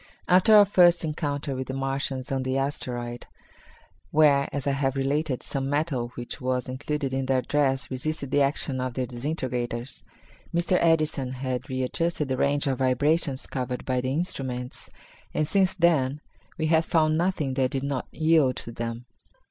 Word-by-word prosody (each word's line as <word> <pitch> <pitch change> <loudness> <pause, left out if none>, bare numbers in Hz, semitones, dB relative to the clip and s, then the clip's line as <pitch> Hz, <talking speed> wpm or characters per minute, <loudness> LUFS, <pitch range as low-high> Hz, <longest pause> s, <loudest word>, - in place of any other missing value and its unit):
After 185 +4 +6
our 205 -1 +9
first 175 -3 +5
encounter 145 -2 -2
with 130 0 -4
the 130 - -4
Martians 135 -1 -2
on 135 -1 0
the 130 +1 -1
asteroid, 120 -3 -3 0.8
where, 145 -3 +4
as 140 -1 -3
I 140 - +2
have 135 -1 0
related, 140 0 -1
some 135 -1 -3
metal 145 -4 0
which 120 0 -7
was 125 0 -1
included 140 +1 -3
in 135 0 -1
their 130 -1 +2
dress 135 -2 0
resisted 140 +1 -3
the 145 - +3
action 135 -1 0
of 130 -2 -3
the 130 - -1
disintegrators, 125 -1 -4 0.5
Mr. 170 +1 +1
Edison 155 -6 +2
had 130 0 -4
readjusted 135 +4 -1
the 130 - 0
range 145 +2 +1
of 135 -3 -1
vibrations 135 +2 +1
covered 125 -1 -4
by 130 -1 0
the 130 +1 -2
instruments, 130 -5 -4 0.5
and 155 - +1
since 190 0 +2
then 150 -6 +2 0.4
we 160 - -1
had 160 +1 +3
found 155 -1 +2
nothing 165 -5 0
that 130 -1 +1
did 135 0 -3
not 140 -2 -2
yield 155 -5 +3
to 115 - -6
them. 115 +1 -5
135 Hz, 165 wpm, -26 LUFS, 130-155 Hz, 0.8 s, our